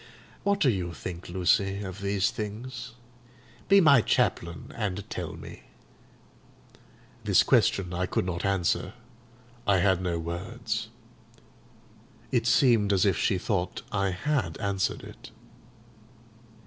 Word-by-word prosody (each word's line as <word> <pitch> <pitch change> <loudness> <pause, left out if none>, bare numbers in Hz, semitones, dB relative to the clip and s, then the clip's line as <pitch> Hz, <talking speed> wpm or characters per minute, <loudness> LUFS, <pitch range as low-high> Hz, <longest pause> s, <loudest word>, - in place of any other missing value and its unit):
What 200 0 +1
do 135 -9 +4
you 90 -4 -3
think, 85 +3 -7
Lucy, 95 +2 +1
of 95 +1 -7
these 100 0 +1
things? 120 +4 -6 0.8
Be 200 0 +7
my 140 -8 +6
chaplain, 85 -4 0
and 100 -3 -3
tell - - -4
me." - - -10 1.6
This - - +4
question 90 -3 +2
I 90 +1 -1
could - - -1
not 85 -1 -3
answer: 95 0 0 0.7
I 100 -2 +5
had 95 0 +2
no 90 -2 -1
words. 110 +7 -4 1.4
It - - +1
seemed 115 -6 +4
as 100 0 +3
if 95 -4 +3
she 95 - +1
thought 90 -1 -2
I 100 -1 +1
had 95 - -1
answered 100 -2 -1
it. - - -11
100 Hz, 120 wpm, -27 LUFS, 90-110 Hz, 1.6 s, Be